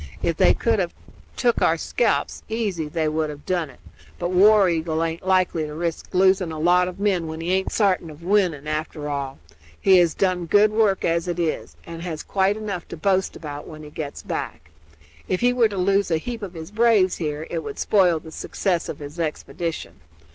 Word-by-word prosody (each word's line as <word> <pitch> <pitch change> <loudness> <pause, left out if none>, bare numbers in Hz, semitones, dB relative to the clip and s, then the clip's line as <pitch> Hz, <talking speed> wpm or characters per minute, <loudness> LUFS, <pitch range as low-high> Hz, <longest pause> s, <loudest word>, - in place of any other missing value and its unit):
If 170 - +1
they - - +5
could 225 -2 +1
have 175 -2 -2 0.4
tuk 240 -2 +2
our - - +3
scalps - - 0
easy 205 -8 -2
they 155 +1 -1
would 155 0 0
have 145 -1 -9
done 175 -5 -1
it; 130 - -17 0.4
but 175 0 -2
War 200 +2 +6
Eagle 165 -1 0
aint 165 +2 -4
likely 185 -4 +2
to 150 - -7
risk 165 0 -3
losing 190 -2 +3
a 160 - -5
lot 180 +3 +3
of 180 +1 -7
men 190 -5 +1
when 160 0 -6
he 165 +2 -2
aint 190 0 0
sartin 190 -6 +1
of 155 +2 -12
winning, 175 -6 +1
after 155 0 -3
all. 140 -2 -4 0.4
He 190 -1 +6
has 170 -2 +2
done 180 -3 0
good 205 +4 +5
work 215 -3 +2
as 170 +1 0
it 175 -1 -2
is, 165 -2 -2
and 165 0 -8
has 165 -3 -5
quite 195 +1 +1
enough 200 -5 -5
to - - -8
boast 190 +3 +1
about 145 -2 -7
when 155 -1 -10
he 150 - -11
gets 145 -2 -6
back. 75 0 -5 0.6
If 185 - -1
he 245 0 +4
were 235 -3 +3
to 200 - -6
lose 195 +2 +2
a 165 - +2
heap 230 +7 -5
of 190 -3 -7
his 160 +3 -8
braves 210 -4 +3
here 150 -1 -3
it 170 - -1
would 215 - -6
spoil 185 -5 +3
the 160 0 -12
success 175 +1 -2
of - - -5
his 145 +3 -9
expedition. 165 +1 -4
175 Hz, 210 wpm, -23 LUFS, 160-195 Hz, 0.6 s, War